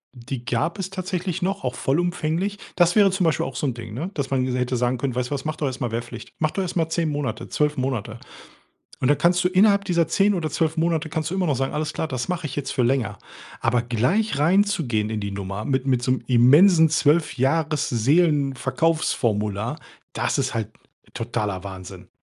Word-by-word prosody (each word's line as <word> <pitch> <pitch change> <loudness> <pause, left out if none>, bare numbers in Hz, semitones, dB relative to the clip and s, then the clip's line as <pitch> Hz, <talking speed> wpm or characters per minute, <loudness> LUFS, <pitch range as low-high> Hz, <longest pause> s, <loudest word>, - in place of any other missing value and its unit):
Die 125 0 -7
gab 125 - -1
es 190 -1 -4
tatsächlich 185 -1 -3
noch, 195 -1 -2
auch 125 -1 -1
vollumfänglich. 175 +5 -1 0.2
Das 175 +1 +3
wäre 205 -2 +6
zum 185 0 -1
Beispiel 160 -2 +1
auch - - -8
so - - -2
'n 130 - 0
Ding, 115 -2 -8
ne, 170 +9 -4
dass 140 -3 -3
man 135 -1 +1
mir 130 - -1
so 125 - -1
hätte 125 0 0
sagen 125 +1 0
können: 130 -1 -2
„Weißt 125 +1 -2
du - - 0
was, 140 - -3
mach 155 0 -3
doch 155 - -3
erst 130 -1 -4
mal 120 - 0
Wehrpflicht. 120 0 -6
Mach 155 -1 0
doch 195 - -2
erst 185 - -4
mal 165 -2 +1
10 165 0 -1
Monate, 140 -7 -3
12 150 0 0
Monate. 120 -4 -3 0.8
Und - - -1
dann 145 - +4
kannst 180 +3 +2
du - - +4
innerhalb 200 +2 +4
dieser 170 -4 +1
10 200 +1 +3
oder 160 -4 -2
12 160 +2 0
Monate 165 -1 0
kannst 155 0 -3
du 190 - -2
immer 185 -2 +1
noch 150 - +1
sagen: 135 +1 -1
,Alles 150 0 -2
klar, 160 - -3
das 130 -2 -3
mache 180 -3 -2
ich 135 - -8
jetzt 145 -2 -3
für 130 - +1
länger.’“ 120 -4 0 0.4
Aber 125 - +2
gleich 130 - 0
reinzugehen 160 - +2
in 110 -1 -3
die 100 0 -4
Nummer 100 +1 -5
mit 130 +1 -1
mit 130 -3 +1
so 125 - 0
'nem 130 - -3
immensen 155 +8 +6
12- 155 +1 +2
Jahres-Seelenverkaufsformular, 140 - +1 0.4
das - - -1
ist 130 -1 0
halt 110 -2 -2 0.4
totaler 105 -5 -3
Wahnsinn. 95 -2 -9
145 Hz, 215 wpm, -23 LUFS, 120-170 Hz, 0.8 s, wäre